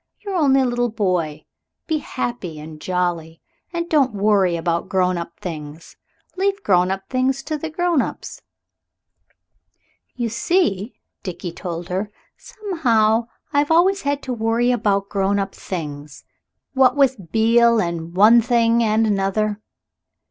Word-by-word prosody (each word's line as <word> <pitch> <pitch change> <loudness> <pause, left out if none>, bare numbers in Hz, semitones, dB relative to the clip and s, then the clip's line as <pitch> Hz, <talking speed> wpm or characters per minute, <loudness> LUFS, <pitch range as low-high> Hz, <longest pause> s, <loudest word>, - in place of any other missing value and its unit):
You're 405 -2 -5
only 275 -6 +3
a - - +2
little 245 0 0
boy. 180 -8 -1 0.4
Be 315 -2 -1
happy 235 - -5
and 155 0 -10
jolly, 175 -3 -2 0.3
and 340 -1 -3
don't 275 -8 +2
worry 200 -3 +2
about 170 0 -2
grown 185 -1 +1
up 170 0 -6
things. 155 -2 -8 0.4
Leave 395 +2 -1
grown 180 -1 +3
up 195 0 -4
things 260 +1 0
to 310 +2 -3
the 315 +2 -4
grown 340 -2 +1
ups." - - -6 1.7
"You 240 -2 -2
see," 230 - 0 0.3
Dickie 180 -2 -6
told 170 0 -6
her, 190 +3 -2 0.3
"somehow 245 - 0 0.3
I've 290 0 +2
always 370 +5 +3
had 285 0 -2
to 255 - -3
worry 230 +1 +1
about 205 -4 0
grown 200 0 0
up 195 -1 -2
things. 150 -5 -7 0.5
What 260 -2 +4
with 250 - +1
Beale, 230 +1 +4
and 170 -2 -3
one 220 +5 +7
thing 235 0 +2
and 220 0 +2
another." 205 +1 0
220 Hz, 140 wpm, -21 LUFS, 180-265 Hz, 1.7 s, one